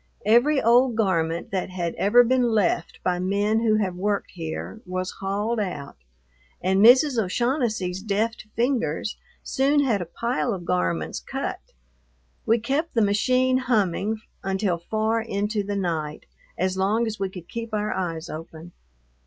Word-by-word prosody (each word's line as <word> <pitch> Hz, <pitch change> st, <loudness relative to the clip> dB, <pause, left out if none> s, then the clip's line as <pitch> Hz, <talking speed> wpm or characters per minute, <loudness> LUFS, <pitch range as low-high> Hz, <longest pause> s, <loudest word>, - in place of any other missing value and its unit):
Every 245 Hz, +7 st, +4 dB
old 240 Hz, +1 st, +4 dB
garment 170 Hz, -6 st, 0 dB
that 190 Hz, -1 st, -2 dB
had 175 Hz, -2 st, -3 dB
ever 230 Hz, +5 st, +5 dB
been 255 Hz, +2 st, +2 dB
left 220 Hz, -6 st, +1 dB
by 180 Hz, -1 st, 0 dB
men 200 Hz, +4 st, +1 dB
who 225 Hz, -2 st, +2 dB
have 200 Hz, -4 st, 0 dB
worked 200 Hz, +2 st, -1 dB
here 165 Hz, +6 st, -6 dB
was 185 Hz, 0 st, -3 dB
hauled 205 Hz, +4 st, -1 dB
out, 180 Hz, -9 st, -4 dB, 0.6 s
and 190 Hz, +2 st, +2 dB
Mrs. 255 Hz, +2 st, +6 dB
O'Shaughnessy's 220 Hz, -3 st, -1 dB
deft 215 Hz, +2 st, -2 dB
fingers 230 Hz, -, 0 dB, 0.3 s
soon 285 Hz, +2 st, +2 dB
had 225 Hz, -8 st, +1 dB
a -, -, -3 dB
pile 235 Hz, +3 st, -1 dB
of 175 Hz, -2 st, -8 dB
garments 85 Hz, -, -1 dB
cut. -, -, -4 dB, 0.9 s
We 230 Hz, -, +4 dB
kept 275 Hz, +8 st, -2 dB
the 225 Hz, -, +4 dB
machine 255 Hz, +5 st, +2 dB
humming 215 Hz, -3 st, 0 dB, 0.2 s
until 190 Hz, -2 st, 0 dB
far 220 Hz, +5 st, 0 dB
into 210 Hz, -1 st, -1 dB
the 205 Hz, 0 st, -3 dB
night, 160 Hz, -6 st, -3 dB, 0.3 s
as 185 Hz, +1 st, 0 dB
long 210 Hz, +5 st, +2 dB
as 215 Hz, -2 st, -4 dB
we 195 Hz, -1 st, -1 dB
could 180 Hz, -2 st, -10 dB
keep 230 Hz, 0 st, -6 dB
our 210 Hz, 0 st, -1 dB
eyes 170 Hz, -3 st, -3 dB
open. 165 Hz, +1 st, -9 dB
205 Hz, 150 wpm, -24 LUFS, 185-235 Hz, 0.9 s, Mrs